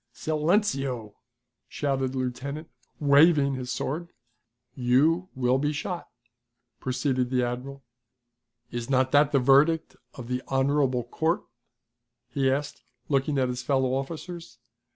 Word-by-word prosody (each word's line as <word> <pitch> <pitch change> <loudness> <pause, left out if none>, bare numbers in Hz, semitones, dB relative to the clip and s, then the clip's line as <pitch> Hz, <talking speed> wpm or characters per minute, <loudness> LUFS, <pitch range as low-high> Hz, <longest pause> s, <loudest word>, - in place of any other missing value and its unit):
"Silenceo!" 150 - 0 0.6
shouted 135 -2 -1
the - - -4
lieutenant, 140 +5 -4 0.3
waving 145 0 +5
his 125 -1 -4
sword. 160 +7 -3 0.6
"You 150 +9 +2
will 130 0 +2
be 145 +1 0
shot," 170 +4 -4 0.7
proceeded 130 -1 -1
the 125 -1 +1
admiral. 130 +3 -5 0.9
"Is 120 0 -4
not 130 -1 +2
that 145 0 +4
the 140 - +3
verdict 140 +5 +3 0.2
of 125 -3 -8
the 125 0 -2
honorable 135 -2 +1
court?" 160 - -1 0.9
he 135 0 +1
asked, 145 +2 -2 0.3
looking 140 0 +1
at 130 -1 +2
his 125 0 -3
fellow 130 -1 +1
officers. 155 -1 -5
135 Hz, 120 wpm, -27 LUFS, 125-150 Hz, 0.9 s, waving